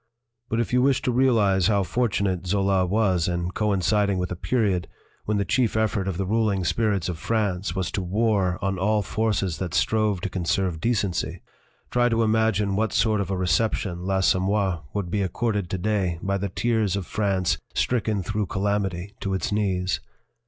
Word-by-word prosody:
"But 115 - 0
if 120 - -1
you 125 - +4
wish 135 0 +2
to 125 - +1
realize 110 -7 +3
how 100 -2 +2
fortunate 95 -5 -1
Zola 95 -1 +2
was 95 -4 +1
in 85 0 -2
coinciding 100 0 +1
with 90 0 -2
a - - -2
period 100 -3 0 0.4
when 105 0 0
the 100 - 0
chief 115 +3 +1
effort 110 -3 0
of 95 -3 -2
the 95 - -1
ruling 105 -2 +1
spirits 100 0 0
of 85 -3 -4
France 95 -4 -1
was 95 -3 -2
to 100 - -2
war 95 -1 +1
on 95 -1 -1
all 105 +2 +2
forces 100 -5 -1
that 90 -5 -3
strove 110 -3 +2
to 100 - -2
conserve 90 -2 -1
decency, 105 -6 -1 0.5
try 120 0 +3
to 115 0 +2
imagine 110 -3 +2
what 110 +2 0
sort 110 -2 +2
of 95 - -4
a 95 - -1
reception 90 0 0
L'Assom 95 -1 +2
moir 95 -5 0
would 100 -4 -3
be 100 - 0
accorded 100 0 -1
to 95 - -2
day 95 -3 0
by 100 0 0
the 100 +1 -2
tears 110 -1 0
of 100 -3 -3
France 95 -3 0 0.2
stricken 110 -5 0
through 105 0 -2
calamity 100 -1 -2
to 95 -1 -2
its 95 - -2
knees. 95 -3 0
100 Hz, 180 wpm, -24 LUFS, 90-110 Hz, 0.5 s, you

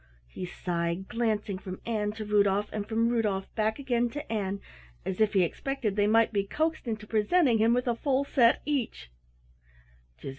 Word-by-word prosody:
He 180 - -6
sighed, 170 +1 -3
glancing 215 -4 -1
from 185 -1 -7
Ann 210 -3 -1
to 220 0 -6
Rudolf 205 0 +2
and 210 0 -4
from 230 +1 +2
Rudolf 210 -5 -1
back 220 0 0
again 245 -4 0
to 290 0 -7
Ann, 200 -2 -2 0.5
as 190 +3 -2
if 215 -1 +3
he 190 -2 +4
expected 230 +3 -2
they 205 0 +3
might 225 +1 +4
be 200 -1 +2
coaxed 315 +7 -2
into 215 -2 -3
presenting 230 +4 +3
him 225 +2 +4
with 250 +1 -1
a 240 - +3
full 270 +2 +1
set 245 -4 +3
each. 240 - -2
215 Hz, 175 wpm, -28 LUFS, 200-240 Hz, 0.5 s, he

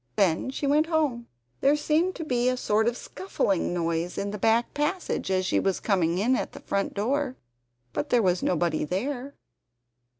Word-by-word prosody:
Then 185 +4 +2
she 270 +2 -3
went 300 +3 +3
home. 295 -8 0 0.3
There 280 +2 +4
seemed 315 +5 +1
to 325 - -5
be 250 -4 +1
a 255 - 0
sort 220 -2 +1
of 240 +1 0
scuffling 200 - -1
noise 170 0 -1
in 200 0 -2
the 210 - -5
back 225 +3 +2
passage, 300 - -1
as 185 -1 +1
she - - +2
was 195 -1 0
coming 175 -5 +1
in 235 +7 +2
at - - -3
the - - -9
front 200 0 -2
door. 260 +5 0 0.6
But 145 - -2
there 240 -2 +3
was 180 -1 +2
nobody 170 -2 +1
there. 255 - -3
235 Hz, 185 wpm, -26 LUFS, 185-280 Hz, 0.6 s, There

